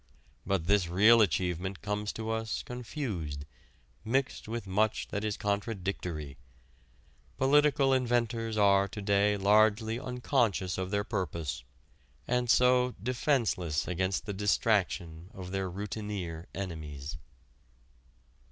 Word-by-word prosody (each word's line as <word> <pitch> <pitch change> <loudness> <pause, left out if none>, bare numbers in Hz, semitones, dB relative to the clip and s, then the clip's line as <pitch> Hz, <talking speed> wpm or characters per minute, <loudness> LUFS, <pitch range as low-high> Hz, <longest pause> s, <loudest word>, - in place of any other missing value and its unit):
But 95 -4 0
this 100 -1 +3
real 105 +7 +6
achievement 90 0 0
comes 105 +1 -2
to 110 0 -4
us 110 0 -2
confused, 110 - -5 0.6
mixed 130 +2 -1
with 115 -1 -4
much 105 +3 0
that 105 0 -3
is 105 -1 -1
contradictory. 95 - -3 1.0
Political 140 0 +4
inventors 120 -3 0
are 100 -1 +4
to 105 +2 -8
day 100 0 +2
largely 110 +3 +3
unconscious 120 -8 0
of 95 0 -2
their 100 0 0
purpose, 85 - -3 0.6
and, 125 0 0
so, 125 0 +4
defenceless 120 - 0
against 95 +2 -1
the 105 - -4
distraction 95 -4 0
of 90 -1 -7
their 95 -1 -2
routineer 95 -3 -5
enemies. 75 -7 -6
105 Hz, 110 wpm, -30 LUFS, 90-115 Hz, 1.0 s, real